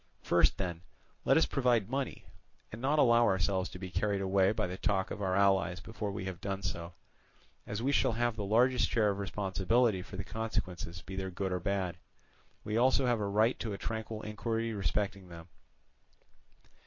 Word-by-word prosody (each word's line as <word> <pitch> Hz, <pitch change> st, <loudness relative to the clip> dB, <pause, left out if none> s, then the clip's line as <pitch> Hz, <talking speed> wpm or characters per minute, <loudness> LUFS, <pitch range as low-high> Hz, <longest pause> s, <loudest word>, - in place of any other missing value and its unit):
First, -, -, +3 dB
then, 85 Hz, -3 st, -3 dB, 0.4 s
let -, -, +5 dB
us -, -, +5 dB
provide 120 Hz, -6 st, +2 dB
money, 135 Hz, +1 st, -3 dB, 0.5 s
and 110 Hz, -, -8 dB
not 140 Hz, +4 st, +2 dB
allow 120 Hz, -4 st, +5 dB
ourselves 95 Hz, 0 st, +1 dB
to -, -, -9 dB
be 90 Hz, 0 st, -7 dB
carried 100 Hz, +2 st, 0 dB
away 95 Hz, 0 st, +3 dB
by 110 Hz, -, -1 dB
the 90 Hz, +1 st, -4 dB
talk 95 Hz, 0 st, 0 dB
of 105 Hz, -, -5 dB
our 95 Hz, -2 st, 0 dB
allies 95 Hz, -2 st, +3 dB
before 105 Hz, 0 st, -5 dB
we 95 Hz, -1 st, -5 dB
have 95 Hz, -3 st, -6 dB
done 100 Hz, -1 st, -3 dB
so: 85 Hz, -3 st, -4 dB, 0.7 s
as 105 Hz, +3 st, -3 dB
we 135 Hz, -, +2 dB
shall 130 Hz, -3 st, +3 dB
have 120 Hz, 0 st, 0 dB
the 105 Hz, -, -4 dB
largest 120 Hz, +5 st, +3 dB
share 105 Hz, -3 st, +3 dB
of 100 Hz, -, -4 dB
responsibility 100 Hz, +2 st, +1 dB
for 95 Hz, +1 st, -9 dB
the 95 Hz, -, -3 dB
consequences 95 Hz, -6 st, -4 dB
be 95 Hz, -, -7 dB
they 95 Hz, 0 st, -3 dB
good 95 Hz, +1 st, -3 dB
or 90 Hz, -, 0 dB
bad, 95 Hz, -2 st, -1 dB, 0.7 s
we 105 Hz, -, -4 dB
have 115 Hz, -, +3 dB
also 130 Hz, 0 st, +3 dB
a 120 Hz, -1 st, +3 dB
right 105 Hz, +3 st, +1 dB
to 110 Hz, -3 st, -3 dB
a -, -, -4 dB
tranquil 110 Hz, 0 st, -4 dB
inquiry 115 Hz, +2 st, -2 dB
respecting 100 Hz, -2 st, -2 dB
them. 85 Hz, 0 st, -11 dB
100 Hz, 190 wpm, -32 LUFS, 95-115 Hz, 0.7 s, let